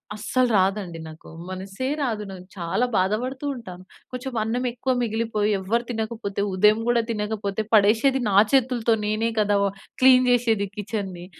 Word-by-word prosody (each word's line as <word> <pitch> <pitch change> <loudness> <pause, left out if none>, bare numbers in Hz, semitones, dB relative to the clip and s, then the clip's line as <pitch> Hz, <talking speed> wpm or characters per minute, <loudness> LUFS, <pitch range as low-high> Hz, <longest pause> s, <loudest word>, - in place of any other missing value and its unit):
అస్సలు 245 +4 0
రాదండి 190 -3 0
నాకు. 155 0 -12 0.2
మనస్సే 195 +7 -5
రాదు. 220 -6 -1
నాకు 185 -1 -10
చాలా 175 +8 0
బాధపడుతూ 245 +9 -1
ఉంటాను. 185 -6 -10 0.3
కొంచెం 255 +1 -6
అన్నం 245 +3 -2
ఎక్కువ 255 +2 -2
మిగిలిపోయి 220 -2 0
ఎవరు 230 +5 -1
తినకపోతే, 220 -3 -3
ఉదయం 210 +3 +4
గూడా 240 -1 +3
తినకపోతే 210 -1 -2
పడేషేది 225 +6 +4
నా 195 - 0 0.2
చేతులతో 245 -4 +2
నేనే 215 +2 0
కదా! 205 -1 +2
వ - - +3 0.4
క్లీన్ 255 -1 +6
జేసేది 225 -5 +2
కిచెన్‌ని. 195 -4 -5
220 Hz, 140 wpm, -24 LUFS, 200-240 Hz, 0.4 s, క్లీన్